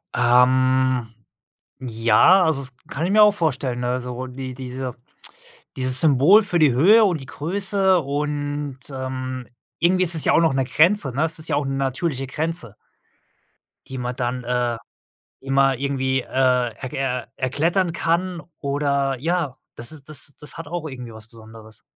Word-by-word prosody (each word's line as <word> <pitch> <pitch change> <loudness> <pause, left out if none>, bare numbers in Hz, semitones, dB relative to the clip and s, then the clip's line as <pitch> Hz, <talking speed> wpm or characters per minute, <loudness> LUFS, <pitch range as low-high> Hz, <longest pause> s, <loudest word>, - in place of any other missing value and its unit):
Ähm, 125 0 +3 0.7
ja, 120 - +4
also, 160 -4 +1
das 130 - -4 0.2
kann 150 - -3
ich 190 - -1
mir 215 +1 +6
auch 210 0 +7
vorstellen. 130 -8 -1
Also, 125 0 -3
die 130 0 -7
diese 130 0 -6 0.8
dieses 130 0 0
Symbol 160 - +5
für 180 -4 0
die 150 -4 +5
Höhe 200 - +6
und 175 -7 0
die - - -10
Größe 190 +6 +1
und, 145 -1 -3
ähm 130 -1 -5 0.4
irgendwie 185 +2 +4
ist 175 -1 +4
es 160 - +4
ja - - +3
auch - - +5
noch 165 -4 +2
ne 135 0 +1
Grenze, 155 +4 +3
ne? 140 +5 0
Es 165 0 -4
ist 155 - -6
ja 155 - +1
auch 145 0 0
'ne 135 - -2
natürliche 135 +1 -2
Grenze 150 - -4 1.1
die 130 - -7
man 125 0 -4
dann, 125 0 -3
äh, 120 -1 -1 0.6
immer 135 0 +2
irgendwie, 130 -1 0
äh, - - -17
erk 125 -1 0
äh, 125 -2 -2
erklettern 165 +7 0
kann 170 +1 -1 0.2
oder, 140 -1 0
ja 160 -2 -1 0.2
das 120 - -6
ist 150 -3 -11
das 155 -1 -4
das 150 - -9
hat 165 - -7
auch 170 -1 -4
irgendwie 125 -5 -8
was 110 0 -12
Besonderes. 110 -1 -14
135 Hz, 165 wpm, -22 LUFS, 125-160 Hz, 1.1 s, auch